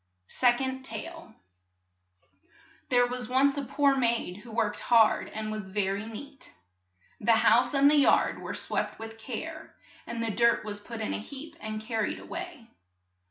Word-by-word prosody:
SECOND 260 Hz, -, +1 dB
TALE 330 Hz, -3 st, -8 dB, 1.5 s
THERE 245 Hz, -1 st, +5 dB
was 245 Hz, -1 st, -4 dB
once 275 Hz, +2 st, +3 dB
a 285 Hz, -, -2 dB
poor 280 Hz, +1 st, +2 dB
maid 235 Hz, -7 st, 0 dB
who 230 Hz, +3 st, -13 dB
worked 220 Hz, -2 st, -1 dB
hard 225 Hz, -2 st, +4 dB
and 215 Hz, 0 st, -4 dB
was 215 Hz, -3 st, -5 dB
ver 195 Hz, 0 st, 0 dB
y 200 Hz, +2 st, -5 dB
neat. 275 Hz, -, -10 dB, 0.6 s
The 230 Hz, +2 st, +4 dB
house 245 Hz, +4 st, +4 dB
and 275 Hz, +1 st, +6 dB
the 295 Hz, +1 st, +5 dB
yard 285 Hz, -, +4 dB
were -, -, -5 dB
swept -, -, -2 dB
with 225 Hz, 0 st, -9 dB
care, 310 Hz, +8 st, -7 dB, 0.3 s
and 235 Hz, -1 st, -3 dB
the 225 Hz, -, -1 dB
dirt 235 Hz, +1 st, +3 dB
was 205 Hz, -1 st, -4 dB
put 225 Hz, +2 st, -8 dB
in 215 Hz, -, -2 dB
a -, -, -2 dB
heap 285 Hz, +8 st, -8 dB
and 215 Hz, 0 st, -6 dB
car 225 Hz, -2 st, -1 dB
ried -, -, -1 dB
a -, -, -11 dB
way. 310 Hz, -11 st, -7 dB
235 Hz, 170 wpm, -28 LUFS, 220-270 Hz, 1.5 s, and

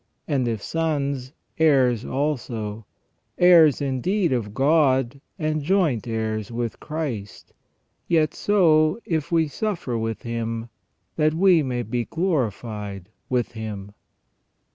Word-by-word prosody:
And 135 Hz, -5 st, 0 dB
if 110 Hz, -3 st, -2 dB
sons, 140 Hz, -5 st, -2 dB, 0.3 s
heirs 130 Hz, -7 st, +4 dB
also 115 Hz, -7 st, -3 dB, 0.2 s
— -, -, -48 dB
heirs 170 Hz, -6 st, +6 dB
indeed 165 Hz, +7 st, 0 dB
of 110 Hz, -5 st, -2 dB
God 135 Hz, -1 st, +2 dB, 0.2 s
and 155 Hz, 0 st, -1 dB
joint 155 Hz, -, +1 dB
heirs 110 Hz, -1 st, -2 dB
with 115 Hz, -1 st, -3 dB
Christ 145 Hz, -10 st, -5 dB, 0.3 s
— -, -, -48 dB
yet 160 Hz, -3 st, +2 dB
so 160 Hz, -4 st, +3 dB
if 160 Hz, -2 st, -2 dB
we 165 Hz, -2 st, +3 dB
suffer 155 Hz, -, -3 dB
with 115 Hz, 0 st, -3 dB
Him, 115 Hz, 0 st, -4 dB, 0.5 s
that 155 Hz, 0 st, +2 dB
we 180 Hz, -1 st, +5 dB
may 125 Hz, -3 st, -2 dB
be 120 Hz, +1 st, -2 dB
glorified 110 Hz, -, -3 dB, 0.2 s
with 125 Hz, -2 st, 0 dB
Him." 105 Hz, -3 st, -6 dB
130 Hz, 120 wpm, -23 LUFS, 115-160 Hz, 0.5 s, heirs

